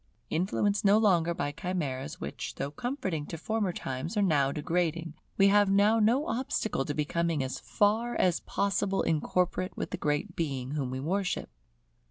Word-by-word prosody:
Influenced 200 +4 +1
no 205 +1 +6
longer 180 -6 +3
by 145 -2 -2
chimeras 150 -5 -3
which - - -5
though 140 - -3
comforting 190 - -3
to 165 - -5
former 210 +3 -1
times 135 - -4
are 205 - +4
now 145 -7 +3
degrading, 165 +1 -1 0.2
we 195 0 +6
have 205 0 +5
now 205 +3 +4
no 240 +7 +3
obstacle 225 - -1
to 145 - -3
becoming 160 0 0
as 130 - -4
far 225 +4 +1
as 180 -2 +2
possible 195 -1 0
incorporate 180 +3 0
with - - -4
the - - -2
Great 150 +5 -1
Being 135 -5 -2
whom 145 -4 -2
we 130 +1 -4
worship. 185 +7 -2
175 Hz, 165 wpm, -29 LUFS, 150-205 Hz, 0.2 s, no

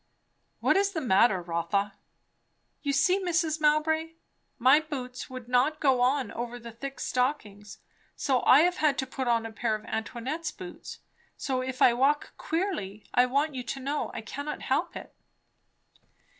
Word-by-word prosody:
"What - - +3
is 400 0 +1
the 320 - -1
matter, 195 - +3
Rotha?" 175 +4 -1 0.9
"You 285 - -1
see, 360 +8 +3
Mrs. 320 -3 0
Mowbray. 315 +2 +2 0.4
My 260 +4 +6
boots 260 -5 -6
would 255 -2 -8
not 255 +5 +2
go 265 -4 +3
on 255 -2 +1
over 240 +1 -5
the 235 -1 -9
thick 275 +5 -7
stockings; 220 -6 -2 0.4
so 260 -3 +1
I 275 - +7
have 355 +2 +2
had 300 -2 +2
to 265 - -1
put 260 0 -4
on 230 -1 +2
a 225 - -6
pair 220 0 -1
of 215 - -9
Antoinette's 260 +8 -4
boots. 180 -11 -10 0.4
So 260 -2 -1
if 255 0 -1
I 240 - +7
walk 275 +4 +1
queerly, 315 - -3
I 250 +1 +4
want 285 +4 +1
you 255 - -4
to 260 +2 -5
know 280 +3 -2
I - - -6
cannot 285 +6 -6
help - - -1
it." - - -9
260 Hz, 165 wpm, -28 LUFS, 235-300 Hz, 0.9 s, I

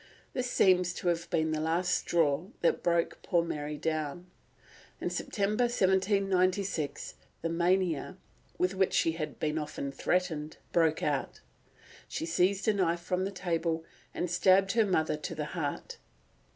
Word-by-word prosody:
This 250 -1 -2
seems 180 -5 +3
to 175 - -1
have 170 0 -1
been 160 -2 +1
the 155 - -1
last 175 +3 +1
straw 160 0 +1
that 170 - +2
broke 170 -1 0
poor 170 -1 +2
Mary 150 -2 -4
down. 155 +2 -2 0.7
In - - -2
September 210 +3 0
1796 190 - +1 0.3
the 165 - 0
mania, 175 -1 +1 0.4
with 180 +1 +1
which 190 -1 +1
she 165 - +3
had 155 -3 -5
been 155 0 0
often 145 -2 -4
threatened, 155 0 -1
broke 160 -2 +2
out; 145 -3 -1 0.7
she - - -4
seized 185 +4 +1
a 215 - +5
knife 175 -4 +1
from 180 +2 -1
the 195 - -3
table 165 -3 -1 0.3
and 175 - -3
stabbed 190 +2 +4
her 225 -1 +3
mother 160 -5 +1
to 155 +2 -5
the 150 -1 -3
heart. 155 -5 -4
175 Hz, 150 wpm, -30 LUFS, 160-185 Hz, 0.7 s, a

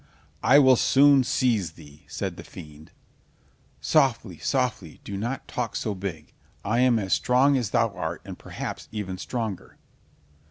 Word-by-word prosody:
"I 135 - +6
will 130 -3 +6
soon 140 +1 +5
seize 110 -9 0
thee," 75 -1 -16
said - - -4
the - - -10
fiend. 75 0 -12 0.9
"Softly, 115 - +1
softly, 125 - -2
do 100 - -6
not 120 +7 -4
talk 120 -3 -4
so 105 - -2
big. 90 -6 -7 0.3
I 110 +4 +1
am 125 -2 +4
as 95 -3 -1
strong 130 +3 +3
as 120 -6 -1
thou 115 0 +1
art, 85 -2 -5
and - - -7
perhaps - - -7
even 95 -4 -5
stronger." 110 -6 -5
110 Hz, 150 wpm, -25 LUFS, 95-125 Hz, 0.9 s, I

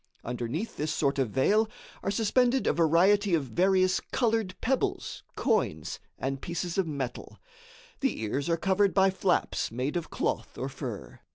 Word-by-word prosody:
Underneath 125 - -4
this 150 +1 -1
sort 140 -1 0
of 130 -4 +1
veil 210 - +3 0.3
are - - -2
suspended 245 +5 +2
a - - +3
variety 180 +4 +4
of 155 - 0
various 185 +5 +2
colored 225 -6 +1
pebbles, 265 +2 -1
coins - - 0 0.2
and 135 0 -3
pieces 175 +1 -3
of 185 - +1
metal. 135 -5 -5 0.6
The 270 - -1
ears 135 +8 -1
are 165 - +2
covered 195 +2 +2
by 190 -1 +5
flaps 190 -1 0
made 130 +6 -2
of 170 -2 -2
cloth - - -2
or 130 - -3
fur. 130 -6 -7
175 Hz, 155 wpm, -28 LUFS, 135-200 Hz, 0.6 s, by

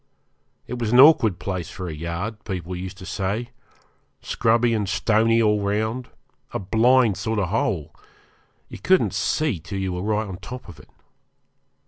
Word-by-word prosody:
It 125 - -6
was 115 -2 -1
an 125 - +5
awkward 130 - +7
place 90 -4 -4
for 90 -2 -7
a 80 - -5
yard, 85 +8 -5
people 90 -2 -5
used 95 +2 -7
to 95 - -10
say; 100 +5 -3 0.7
scrubby 115 +1 +1
and 105 -4 -1
stony 115 +2 +2
all 105 -1 +2
round, 110 +5 -1 0.5
a - - 0
blind 115 +2 +3
sort 110 +3 -2
of 95 -4 0
hole 90 -7 -1 0.7
you - - -10
couldn't 185 - +2
see 150 - 0
till 85 +5 -7
you 95 -1 -2
were 90 - -4
right 105 +2 -1
on 95 - -6
the 90 - -10
top 125 +1 -8
of 85 - -12
it. - - -17
105 Hz, 170 wpm, -23 LUFS, 95-115 Hz, 0.7 s, awkward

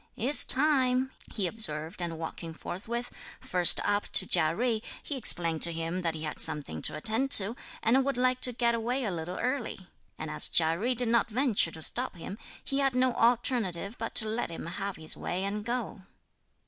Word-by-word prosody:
"It's 265 +6 +5
time," 260 -2 +2 0.2
he 200 - -1
observed 170 -4 -1
and 170 -2 -4
walking 165 0 -7
forthwith, 235 +9 -6 0.3
first 180 -1 +5
up 205 0 -1
to - - +7
Chia 160 -3 +4
Jui, 230 0 -1 0.2
he 290 - -5
explained 170 -10 +2
to 170 - +4
him 165 +2 -4
that 165 -2 -3
he 155 - -6
had 150 - -6
something 145 - -3
to - - +2
attend 225 - -2
to 205 +4 +6 0.3
and 255 +4 +3
would 275 -1 -2
like 255 0 0
to 250 - +3
get 235 0 0
away 240 +3 -2
a 210 - -2
little 175 +1 -6
early; 255 -1 -3 0.4
and 155 0 -6
as 155 - +3
Chia 160 0 +3
Jui 240 +8 -1
did 245 -1 +1
not 235 0 +1
venture 235 -6 +1
to 160 -1 -5
stop 250 +3 -1
him, 185 +5 -9 0.2
he 275 - -3
had 270 -2 0
no 255 0 +1
alternative 230 -5 0
but 225 - -6
to 220 - +6
let 220 -2 -3
him 165 - -8
have 195 +3 -5
his 160 0 -1
way 185 +2 -4
and 205 +1 -4
go. 235 -3 -4
215 Hz, 200 wpm, -28 LUFS, 170-250 Hz, 0.4 s, to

